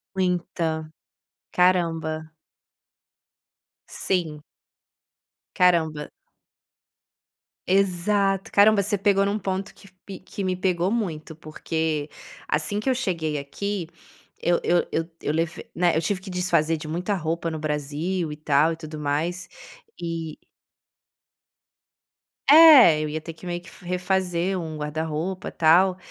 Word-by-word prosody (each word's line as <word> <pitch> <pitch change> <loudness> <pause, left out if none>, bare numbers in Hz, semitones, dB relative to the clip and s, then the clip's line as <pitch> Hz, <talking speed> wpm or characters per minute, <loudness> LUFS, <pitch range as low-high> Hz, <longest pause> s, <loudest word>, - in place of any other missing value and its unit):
Muita. 170 -4 -1 0.6
Caramba. 165 -3 +1 1.6
Sim. 160 -5 -2 1.1
Caramba. 160 -5 +2 1.6
Exato. 195 +1 +1
Caramba, 205 0 +5
você 205 +1 -1
pegou 200 0 +2
num 205 +2 -1
ponto 190 0 -3
que 200 - -17 0.2
pe 195 -2 -8
que 195 +1 -7
me 185 -1 0
pegou 180 0 0
muito, 170 -9 -3
porque 155 -1 -3 0.4
assim 155 +7 -1
que 240 - -1
eu 260 - +2
cheguei 165 - -2
aqui 180 +5 -4 0.5
eu 175 0 +2
eu 175 0 +2
eu 165 +1 -2
eu 150 - -1
leve 165 +1 -2
né, 175 0 +2
eu 160 - +1
tive 185 +4 -1
que 190 - -11
desfazer 180 -3 +1
de 155 -1 -7
muita 180 +6 -2
roupa 165 -2 -2
no 160 - -4
Brasil 155 +3 -2
e - - -7
tal 150 +1 +2
e - - -5
tudo 155 -1 -9
mais, 155 +5 -2 0.5
e 165 -2 -4 2.1
É, 290 - +9
eu 155 - -2
ia 155 +1 -4
ter 165 +1 -8
que 165 - -14
meio 175 0 -4
que - - -14
f - - -17
refazer 180 0 -1
um 160 -2 -6
guarda-roupa, 155 +4 -3
tal, 180 +3 +4
175 Hz, 125 wpm, -24 LUFS, 155-190 Hz, 2.1 s, É